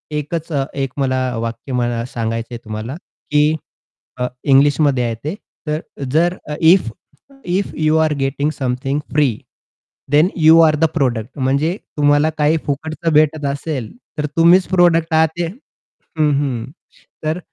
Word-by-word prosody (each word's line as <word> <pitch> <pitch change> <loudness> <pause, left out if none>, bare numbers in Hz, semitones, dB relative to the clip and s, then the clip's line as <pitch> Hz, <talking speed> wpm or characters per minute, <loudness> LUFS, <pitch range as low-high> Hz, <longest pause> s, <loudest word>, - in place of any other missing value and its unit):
एकचं 150 -1 -2 0.3
मला 130 -2 0 0.2
वाक्य, 115 +4 -5
मला 120 -1 0
सांगायचंय 115 -1 -4
तुम्हाला 110 +5 -5 0.4
की, 150 +1 +3 0.6
अ, 125 - -1 0.2
इंग्लिशमध्ये 140 -1 +3
आहे 115 -1 -2
ते. 155 +6 -3 0.3
तर 150 0 0 0.3
जर 175 +4 +2 0.3
ईफ 165 -5 +5 0.6
ईफ 185 +3 -1
यू 155 0 +2
अरे 155 -2 +1
getting 140 +2 0
something 135 +2 -1
free 140 -7 +2 0.7
then 150 +4 +5
you 160 +1 +7
R 155 - +2
the - - +6
product 125 -4 -1
म्हणजे 140 +6 +1 0.2
तुम्हाला 145 +1 +3
काही 150 +2 +3
फुकटचं 160 +3 -2
भेटत 155 0 +3
असेल, 140 -3 -3 0.3
तर 150 - -1
तुम्हीच 175 +3 +5
प्रॉडक्ट 170 -2 +3
आहात 160 0 +5
ते 175 - 0
हं, 165 - -5
हं. 135 -5 -1 0.6
तर 155 +3 -1
150 Hz, 135 wpm, -18 LUFS, 130-160 Hz, 0.7 s, यू